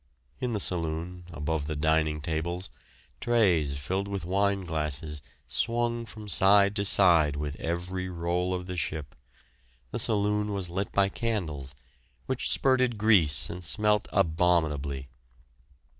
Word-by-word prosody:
In 125 -2 -2
the 105 - -1
saloon, 85 0 -2
above 75 -1 -2
the 80 - -3
dining 80 0 +1
tables, 85 +4 -2 0.5
trays 90 -12 +2
filled 95 +8 -2
with 100 -4 -4
wine 100 +2 +1
glasses 75 -3 -2 0.3
swung 115 - -1
from 110 -1 -10
side 100 +2 +4
to 100 - 0
side 85 -7 +5
with 75 0 -4
every 90 +2 -3
roll 90 +1 -1
of 90 -1 -3
the 90 0 -5
ship; 75 -2 -3 0.8
the - - -3
saloon 105 -1 +1
was 95 -3 -4
lit 95 +3 -2
by 100 -1 +3
candles, 80 - -3 0.5
which 130 -1 -1
spurted 130 -3 +2
grease 100 -9 +4
and 90 +1 -7
smelt 105 +4 +2
abominably. 80 -6 +1
90 Hz, 130 wpm, -28 LUFS, 80-100 Hz, 0.8 s, side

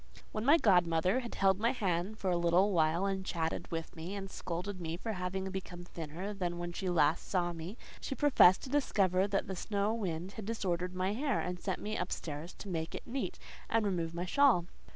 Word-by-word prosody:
When 215 - -3
my 290 +6 +7
godmother 180 - +3
had 240 -2 -6
held 195 0 +3
my 230 +2 +2
hand 195 -2 -1
for 190 -3 -1
a - - +2
little 175 +4 +3
while, 165 +1 +2
and 195 -1 -1
chatted 165 -4 -2
with 165 +1 -4
me, 170 +4 -5
and 195 -1 -6
scolded 180 +2 -4
me 165 0 -3
for 220 +4 -3
having 190 0 -3
become 180 -2 -6
thinner 175 +4 -6
than 175 -3 -2
when 175 0 -4
she 185 +1 -2
last 160 -2 +2
saw 175 -2 +1
me, 170 +7 -7 0.2
she 270 - -4
professed 260 -11 +6
to - - -6
discover 195 -9 +2
that 200 -1 0
the 190 - -4
snow 205 +3 0
wind 185 -5 -3
had 215 -1 -7
disordered 180 -5 -2
my 185 +2 0
hair, 270 +1 0
and 180 0 -3
sent 190 -1 -2
me 215 +1 -3
up 180 - -2
stairs 155 +2 -5
to - - -9
make 165 -3 -3
it - - -7
neat 265 +3 -3 0.3
and 225 -1 +2
remove 170 -4 -1
my 175 +1 -2
shawl. 245 -4 +4
185 Hz, 215 wpm, -33 LUFS, 175-205 Hz, 0.3 s, my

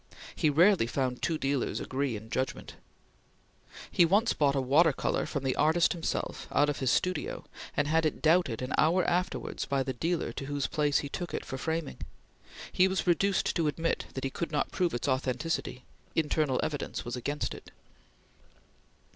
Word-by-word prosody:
He 155 - +2
rarely 170 - +4
found 125 0 -2
two 165 - 0
dealers 140 -2 -1
agree 135 -2 -2
in 110 +2 -9
judgment. 130 0 -3 1.2
He 175 - +5
once 200 +7 +3
bought 140 -2 +2
a - - +2
water 145 +6 +4
color - - -1
from 140 - -3
the 130 -1 0
artist 160 +3 +3
himself 170 -2 -3
out 145 +2 +3
of 145 - -2
his 130 - +1
studio, 180 +3 -1 0.3
and 145 - +2
had 160 +2 +2
it 155 - 0
doubted 155 -8 +2
an 130 - -3
hour 170 +4 +3
afterwards 180 +1 -1
by 135 -1 0
the 130 0 -3
dealer 165 +7 -1
to 135 - -5
whose 145 -1 -2
place 145 -2 +1
he - - -5
took 175 +4 -4
it - - -4
for 130 - -5
framing. 160 0 -3 0.7
He 185 - +4
was 190 0 -1
reduced 190 +2 +2
to 165 -3 +1
admit 165 +3 -1
that 135 - -4
he 135 - -1
could 170 +2 -4
not 150 - -1
prove 175 -5 0
its 120 - -3
authenticity; 130 0 -1 0.3
internal 150 -4 +1
evidence 145 -2 -3
was 120 - -3
against 145 +4 -3
it. - - -11
150 Hz, 180 wpm, -29 LUFS, 135-170 Hz, 1.2 s, He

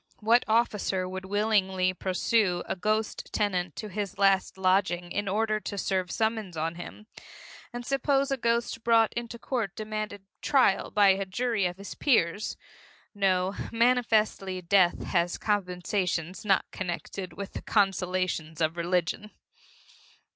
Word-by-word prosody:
What 230 +3 +4
officer 210 -4 +1
would 190 0 -6
willingly 190 -2 +1
pursue 185 0 +1
a - - -3
ghostly 215 +3 -1
tenant 185 -5 -1
to 215 - -5
his 205 -1 -4
last 195 -1 +2
lodging 185 -2 +1
in 205 +2 -2
order 215 +2 +1
to 200 0 -6
serve 185 -2 -1
summons 220 -6 -1
on 160 +1 -1
him? 175 +5 -10 0.7
And 240 0 -6
suppose 275 +1 +1
a 270 - +1
ghost 235 -1 -1
brought 225 -1 +4
into 235 0 -5
court 230 -6 -3
demanded 215 -2 -5 0.2
trial 265 -9 +3
by 205 -1 +5
a 195 +1 +3
jury 215 0 0
of 175 0 -6
his 200 +1 -8
peers? 210 - +1 0.6
No 190 -2 +1 0.2
manifestly 225 -5 +2
death 180 0 +3
has 170 0 0
compensations 180 -3 -1
not 200 -2 +2
connected 185 0 -5
with 200 -1 -7
the - - -5
consolations 185 -5 0
of 160 +1 0
religion. 175 +4 -1
195 Hz, 135 wpm, -28 LUFS, 185-220 Hz, 0.7 s, by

